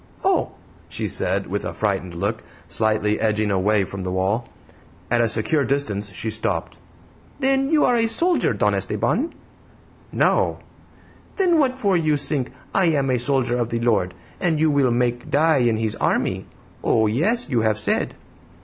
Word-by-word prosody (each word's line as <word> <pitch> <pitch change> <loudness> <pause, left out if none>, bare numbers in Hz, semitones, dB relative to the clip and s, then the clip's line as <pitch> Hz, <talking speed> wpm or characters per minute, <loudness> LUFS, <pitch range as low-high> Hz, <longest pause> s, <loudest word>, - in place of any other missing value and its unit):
"Oh!" - - +1 0.4
she - - -2
said, 95 +2 0
with 100 +3 -3
a - - -5
frightened 95 -4 -2
look, 100 +5 -2 0.2
slightly 110 +2 +1
edging 110 -1 +1
away 100 +2 +2
from 95 +1 -6
the 90 0 -3
wall. 95 +6 0 0.6
At 120 -1 +3
a 115 - +2
secure 130 +7 +1
distance 105 -8 -2
she 105 +5 -4
stopped. 85 -6 -2 0.6
"Then 270 0 +2
you 310 -1 +4
are 245 - +3
a 230 -1 +2
soldier, 340 +11 +2
Don - - +1
Esteban?" 330 - -1 0.8
"No!" - - +2 0.8
"Then 355 -5 +3
what 260 -3 +1
for 200 -7 +1
you 155 -3 +2
sink 140 -2 -1 0.2
'I 190 - +3
am 140 -5 +2
a 125 - +1
soldier 125 -1 +1
of 120 -1 -1
the 115 - -1
Lord,' 100 -6 +1 0.2
and 165 -4 +1
you 155 0 +3
will 140 -3 +3
make 120 0 -1
die 155 +1 +3
'in 120 -3 +2
His 110 -1 -1
army'? - - 0 0.4
Oh, 110 - +3
yes; 180 - +1
you 120 -5 +1
have 110 -1 +1
said." - - -1
120 Hz, 165 wpm, -22 LUFS, 105-155 Hz, 0.8 s, you